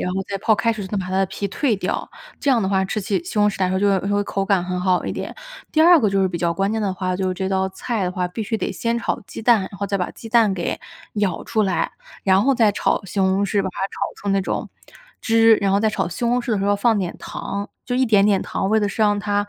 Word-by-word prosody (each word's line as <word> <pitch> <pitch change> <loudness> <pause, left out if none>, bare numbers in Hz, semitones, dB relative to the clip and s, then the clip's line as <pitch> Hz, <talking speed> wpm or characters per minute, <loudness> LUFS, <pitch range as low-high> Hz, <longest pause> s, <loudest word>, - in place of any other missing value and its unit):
然 180 - -2
后 195 - -1
再 200 - -3
泡 215 +2 +3
开 230 +2 +1
水， 210 -3 -5
再 205 - -4
把 185 -2 -2
它 - - -6
的 195 - +2
皮 200 +1 -4
蜕 230 +1 0
掉， - - -3 0.3
这 285 - -3
样 240 -5 +4
的 190 - 0
话 190 -1 +2
吃 210 - -2
起 195 -2 -1
西 - - -4
红 210 - +4
柿 - - -7
来 185 - +2
说 190 0 0
就 205 - +2
会 195 - -4
就 205 - +1
会 205 - +2
口 195 -1 -2
感 195 -3 +2
很 180 0 -3
好 180 -1 +1
一 - - -2
点。 - - -5 0.4
第 315 - +3
二 340 +1 +8
个 215 - +2
就 195 0 +1
是 190 - +2
比 175 - -4
较 170 0 0
关 195 +3 0
键 220 - -1
的 195 -3 -1
话， 185 0 -2
就 190 0 -1
是 185 - -1
这 190 +1 -2
道 190 0 0
菜 210 +1 -3
的 180 - -2
话， 180 -1 -2
必 180 - -7
须 220 +2 -2
得 - - -2
先 235 0 -1
炒 - - -2
鸡 - - -8
蛋， 235 -2 +5
然 - - -6
后 200 0 -5
再 200 0 -1
把 180 - -1
鸡 225 - -10
蛋 220 -4 +4
给 175 - -3 0.4
舀 205 -5 -1
出 220 -2 0
来， 190 -2 0 0.3
然 190 0 +4
后 275 +4 +3
再 225 -4 +4
炒 200 - 0
西 195 +2 -6
红 190 +1 +2
柿， 200 +1 +1
把 190 - -2
它 - - -12
炒 - - -11
出 200 - -7
那 195 0 +2
种 - - -3 0.5
汁， 225 -1 +5
然 195 -1 0
后 200 - +3
再 220 -1 +2
炒 200 -4 -1
西 210 +7 -4
红 245 +1 +2
柿 240 -1 -2
的 205 - +1
时 195 - -1
候 205 0 +2
放 225 +1 +2
点 180 -3 -3
糖， 200 +1 -5 0.2
就 245 0 -2
一 260 0 +3
点 205 -3 +4
点 200 -2 +3
糖， 195 - -2
为 220 - +4
的 205 -1 +1
是 215 +2 -1
让 205 -1 +3
它 205 0 -1
200 Hz, 325 characters per minute, -21 LUFS, 190-220 Hz, 0.5 s, 二